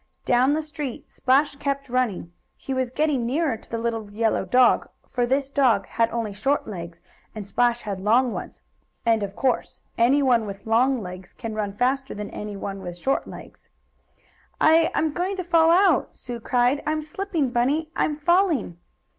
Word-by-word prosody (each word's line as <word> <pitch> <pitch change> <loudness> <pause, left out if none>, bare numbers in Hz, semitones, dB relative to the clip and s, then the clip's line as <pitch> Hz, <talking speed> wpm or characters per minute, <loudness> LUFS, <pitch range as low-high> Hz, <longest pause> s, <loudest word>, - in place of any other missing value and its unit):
Down 255 +4 +3
the 315 - -1
street 295 -4 -7
Splash 275 +3 +2
kept 280 -1 -2
running. 240 -9 -1 0.2
He 270 - -5
was 260 -1 -1
getting 290 -1 0
nearer 275 +2 0
to 220 - -16
the 230 - -3
little 225 -2 -3
yellow 220 -2 0
dog, 250 +6 +4 0.2
for 245 -1 0
this 270 +2 0
dog 240 -9 +3
had 230 0 0
only 225 -3 -3
short 270 +8 0
legs, 170 -4 -8 0.3
and 215 -2 -6
Splash 240 +3 +1
had 200 -3 -4
long 230 +5 +3
ones, - - -7 0.4
and, 225 -2 +3
of 200 -1 -4
course, 260 -2 -1 0.2
anyone 245 -2 +3
with 200 0 -8
long 240 +2 +2
legs 180 0 -9
can 225 -3 -6
run 210 -2 -2
faster 260 +5 -1
than 210 0 -6
anyone 200 -1 -6
with 175 -2 -7
short 265 +10 -1
legs. - - -12 0.9
"I 325 +1 +5
I'm 315 -2 +1
going 365 +4 -1
to 370 - -3
fall 335 -2 +4
out!" 355 -3 +3
Sue 240 -2 -7
cried. 245 +4 +1
"I 305 - +2
I'm 310 0 -2
slipping, 310 -4 -2
Bunny! 285 +7 0
I'm 300 - 0
falling!" 320 - +1
250 Hz, 175 wpm, -24 LUFS, 220-290 Hz, 0.9 s, I